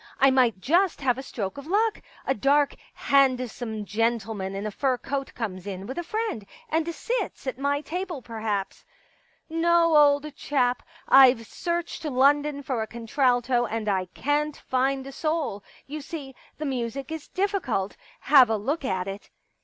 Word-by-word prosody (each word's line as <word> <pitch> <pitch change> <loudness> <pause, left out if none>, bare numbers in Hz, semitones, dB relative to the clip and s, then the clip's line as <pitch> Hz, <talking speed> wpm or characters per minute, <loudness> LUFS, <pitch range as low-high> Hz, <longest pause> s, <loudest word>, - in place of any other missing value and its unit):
I 270 0 +6
might 245 -6 +3
just 345 - +2
have 255 -2 +1
a - - -3
stroke 215 -4 -5
of 280 - -10
luck.... 425 +4 +1 0.2
A 270 - +2
dark 280 +4 +3 0.2
handsome 250 -5 +1
gentleman 215 -2 -1
in 200 +2 -4
a 215 - -2
fur 260 +3 0
coat 275 +2 -4
comes 200 -5 -5
in 190 -1 -5
with 260 +9 -5
a - - -3
friend, 430 - -3 0.3
and 320 +1 0
sits 475 - -3
at 260 -1 -4
my 285 +1 0
table, 355 0 -4
perhaps. 215 -4 -3 0.4
* - - -37 0.2
No, 335 0 +3
old 290 0 +4
chap, 250 -4 0 0.3
I've 260 -4 +7
searched 340 +9 -3
London 285 +1 +2
for 260 -4 -2
a 220 - -3
contralto 245 +1 +1
and 220 0 -3
I 190 -2 +1
can't 295 +1 0
find 265 +1 0
a 275 - -7
soul. 305 -9 -2 0.2
You 300 +2 -6
see, 285 -2 -7 0.2
the 305 - -4
music 265 +2 -3
is 320 -2 -6
difficult; 370 - -1 0.3
have 270 -4 +7
a 220 - +1
look 280 +10 -2
at 190 -6 -1
it.' 195 +1 -7
265 Hz, 165 wpm, -26 LUFS, 225-300 Hz, 0.4 s, I've